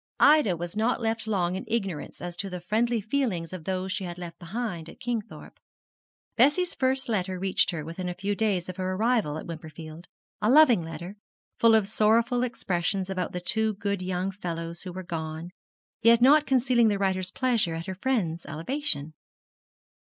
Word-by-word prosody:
Ida 290 - +5
was 175 +3 -5
not 225 +4 +1
left 225 -1 -2
long 185 -4 0
in 190 - -4
ignorance 195 -9 -3
as 175 -1 -5
to 195 - -3
the 180 -1 -5
friendly 225 +5 0
feelings 210 -8 -1
of 175 -4 -7
those 190 0 -2
she 195 - -2
had 175 -1 -6
left 175 -2 -8
behind 175 -3 -4
at - - -14
Kingthorpe. 235 -4 -5 0.8
Bessie's 290 +9 +3
first 265 0 0
letter 190 -5 -1
reached 190 +1 +1
her 160 -4 -3
within 180 +3 -4
a 175 - -4
few 200 +3 -2
days 200 -4 0
of 185 0 -7
her 185 0 -1
arrival 220 -8 +1
at - - -7
Wimperfield 160 0 -9 0.3
a 210 - +2
loving 270 -5 +7
little 165 -1 -6
letter, 175 +6 -8 0.4
full 230 -1 +6
of 215 -3 +3
sorrowful 225 +3 +3
expressions 190 -5 -1
about 185 -1 -2
the 180 - -3
two 215 +4 0
good 200 -1 -2
young 185 +1 -2
fellows 170 -3 -5
who 185 - -6
were 185 +1 -6
gone, 160 0 -5 0.5
yet 230 0 +6
not 290 +5 +6
concealing 250 -3 +4
the 205 -2 +2
writer's 190 -2 0
pleasure 230 -10 +1
at 165 +1 -5
her 190 - -4
friend's 185 -6 -1
elevation. 160 - -2
195 Hz, 180 wpm, -27 LUFS, 175-230 Hz, 0.8 s, loving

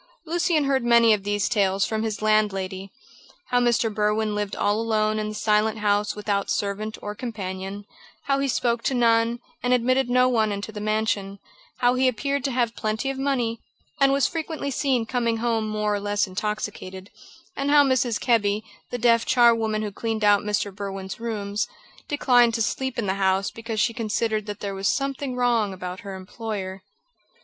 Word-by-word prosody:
Lucian 335 -1 +1
heard 270 -2 +1
many 235 -1 +6
of 205 -2 -1
these 205 0 0
tales 195 -3 +2
from 220 +2 -2
his 220 -1 -3
landlady. 195 -3 0 0.6
How 245 - +3
Mr. 235 -2 +2
Berwin 210 +1 +1
lived 205 -1 -2
all 205 +2 +1
alone 215 -1 +1
in 215 0 -2
the 215 - -6
Silent 215 +1 +1
House 205 0 +1
without 205 -1 -1
servant 210 +2 -2
or 210 - -4
companion; 200 -3 -6 0.4
how 275 0 +1
he 275 - 0
spoke 235 -1 0
to 265 - +1
none, 230 -1 +3 0.2
and 250 0 +3
admitted 255 +1 +1
no 250 +1 +4
one 220 -4 +2
into 200 +2 -4
the 210 -1 -7
mansion; 210 -2 -1 0.4
how 245 0 +4
he 255 +1 +2
appeared 275 +3 -1
to 275 - 0
have 240 -2 0
plenty 220 +5 -1
of 270 - -6
money, 245 -5 0 0.4
and 275 -1 +5
was 275 -2 +3
frequently 320 -3 -3
seen 260 -3 +1
coming 235 -1 0
home 225 -1 0
more 210 0 0
or 205 - 0
less 205 +1 0
intoxicated; 190 -1 -5 0.4
and 275 +1 -1
how 290 0 +7
Mrs. 255 -4 +1
Kebby, 215 -3 +1 0.3
the 245 - -3
deaf 230 -1 +4
charwoman 225 -3 +3
who 210 - -3
cleaned 220 +1 -3
out 205 -1 +5
Mr. 205 -1 -1
Berwin's 195 -1 -6
rooms, 210 -3 -2 0.4
declined 245 -5 +3
to 225 - +1
sleep 265 +3 -2
in 230 - -1
the 190 - 0
house 190 +1 +2
because 225 -1 -5
she 230 - +2
considered 220 -1 -1
that 205 0 -6
there 200 -1 -3
was 195 0 -2
something 275 -1 -1
wrong 240 -4 +2
about 180 0 -6
her 200 -3 -7
employer. 190 -1 -6
220 Hz, 180 wpm, -24 LUFS, 205-245 Hz, 0.6 s, how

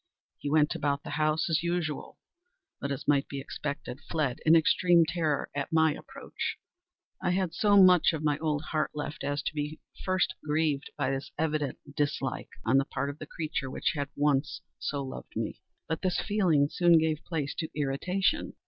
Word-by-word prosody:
He 145 - -3
went 150 +1 +3
about 145 -3 -1
the - - -7
house 155 +1 +1
as 160 -2 +2
usual, 170 -3 -2 0.6
but, 140 - -3
as 135 - -4
might 145 -1 +3
be 140 - -5
expected, 140 -1 -5
fled 150 -6 0
in 160 - +8
extreme 170 +1 +5
terror 160 -3 -1
at 145 -1 -2
my 160 -1 +4
approach. - - -5 0.6
I - - +1
had 180 -2 0
so 205 +2 +4
much 180 -3 +7
of 160 -2 -4
my 150 -1 +1
old 155 -2 -1
heart 155 -1 +1
left, 150 +1 -5
as 145 0 -1
to - - -2
be 150 0 -2 0.2
at - - -15
first 185 -1 +1
grieved 150 -2 0
by 130 - 0
this 135 0 -3
evident 150 -3 -1 0.2
dislike 145 -1 -1 0.2
on 130 +4 +4
the 135 - 0
part 140 -1 -2
of 145 - -15
a - - -6
creature 150 -5 -3
which - - -1
had 145 -1 -2
once 145 0 +1 0.2
so 140 -1 -2
loved 130 - -8
me. - - -3 0.3
But 160 - -2
this 185 -2 +1
feeling 180 -9 +3
soon 175 -1 +5
gave 155 -1 +1
place 150 -5 -2
to 160 - -2
irritation. 150 +7 0
155 Hz, 185 wpm, -29 LUFS, 145-165 Hz, 0.6 s, in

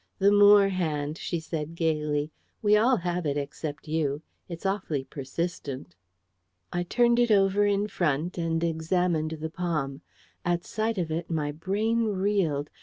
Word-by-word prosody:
"The 200 +1 +4
Moore 205 -1 +7
hand," 155 -5 -2
she 170 - -2
said 160 0 -5
gaily. 150 -2 0 0.3
"We 210 0 +5
all 240 +4 +4
have 175 -1 -2
it, 145 0 0
except 145 +2 -5
you. 150 -1 -1 0.3
It's 170 +2 -7
awfully 190 -8 -1
persistent." 135 - -5 0.8
I 175 - 0
turned 240 +6 +3
it 240 -1 +3
over 200 0 +4
in 205 0 +1
front 170 -2 -1
and 165 0 0
examined 160 -1 0
the 160 +1 -4
palm. 155 -6 -2 0.4
At 175 0 0
sight 220 +1 -2
of 170 -3 -2
it 165 +2 -3
my 155 -3 -1
brain 210 +9 0
reeled. 190 -8 0
170 Hz, 150 wpm, -27 LUFS, 150-195 Hz, 0.8 s, Moore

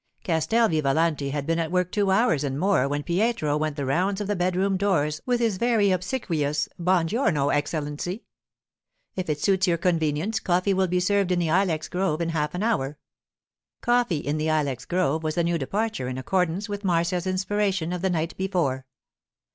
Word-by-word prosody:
Castel 220 +8 +2
Vivalanti 155 -2 +1
had 140 0 -3
been 165 +2 0
at 165 -1 -1
work 180 0 0
two 205 -2 +1
hours 190 - +3
and 140 -1 -2
more 190 -7 +2
when 145 +1 -2
Pietro 185 -3 0
went 155 -1 -1
the 140 -2 -3
rounds 185 +9 0
of 205 - -2
the 205 +1 -1
bedroom 185 +2 +1
doors 155 -6 0
with 245 -1 +2
his 225 -5 +1
very 220 -3 +2
obsequious, 165 - -1
'Buon 175 -1 +2
giorno, 160 - +1
Excellency; 150 +6 -2 0.9
if 185 -3 -3
it 150 -1 -1
suits 190 +2 +2
your 170 -1 +2
convenience, 165 +4 0
coffee 185 +1 +1
will 190 0 +2
be 180 +1 +1
served 195 0 +1
in 180 - +2
the 170 -2 0
ilex 170 -3 +1
grove 180 -4 -1
in 170 -1 -1
half 150 -1 -1
an 180 - -2
hour.' 150 -11 0 0.8
Coffee 240 -8 +2
in 145 +1 -2
the 155 +1 0
ilex 145 -5 -1
grove 175 -4 0
was 155 +1 -3
a 170 - +3
new 170 0 0
departure 205 - -2
in 130 0 -4
accordance 180 - -1
with 205 0 -5
Marcia's 175 0 0
inspiration 190 -2 0
of 180 - -3
the 190 - +1
night 165 -1 -1
before. 165 -9 -1
175 Hz, 185 wpm, -25 LUFS, 155-195 Hz, 0.9 s, hours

